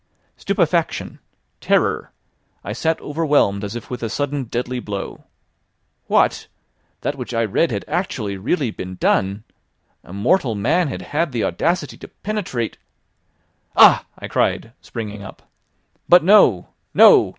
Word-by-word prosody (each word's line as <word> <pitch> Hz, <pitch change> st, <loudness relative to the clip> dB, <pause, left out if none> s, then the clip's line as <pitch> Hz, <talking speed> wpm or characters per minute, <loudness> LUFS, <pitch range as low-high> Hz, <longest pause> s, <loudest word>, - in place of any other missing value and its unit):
Stupefaction! -, -, -1 dB, 0.4 s
terror! -, -, +1 dB, 0.5 s
I 100 Hz, -, -4 dB
sat 160 Hz, +7 st, -1 dB
overwhelmed 145 Hz, -10 st, +1 dB
as 105 Hz, +2 st, -5 dB
if 120 Hz, -, -8 dB
with 125 Hz, -, -5 dB
a 115 Hz, -, -2 dB
sudden 145 Hz, +2 st, -2 dB
deadly 125 Hz, +2 st, -3 dB
blow. 100 Hz, -4 st, -6 dB, 0.8 s
What! -, -, +2 dB, 0.5 s
that 145 Hz, -, -2 dB
which 125 Hz, -1 st, -5 dB
I 115 Hz, -, +2 dB
read 140 Hz, -, +1 dB
had 100 Hz, -5 st, -4 dB
actually, 135 Hz, -, -2 dB
really 120 Hz, -, -1 dB
been 95 Hz, -2 st, -7 dB
done! 95 Hz, +3 st, 0 dB, 0.6 s
A -, -, -14 dB
mortal 115 Hz, -, +1 dB
man 155 Hz, -, +1 dB
had 135 Hz, -, -5 dB
had 155 Hz, +1 st, -1 dB
the 115 Hz, -, -1 dB
audacity 170 Hz, +3 st, -1 dB
to -, -, -10 dB
penetrate!... 180 Hz, -, -4 dB, 1.0 s
"Ah!" -, -, +7 dB
I -, -, -7 dB
cried, 115 Hz, -, -1 dB
springing 105 Hz, -3 st, -7 dB
up. 95 Hz, -, -11 dB, 0.7 s
"But 175 Hz, -1 st, +7 dB
no! 165 Hz, -, +5 dB, 0.3 s
no! -, -, +7 dB
120 Hz, 135 wpm, -20 LUFS, 105-155 Hz, 1.0 s, Ah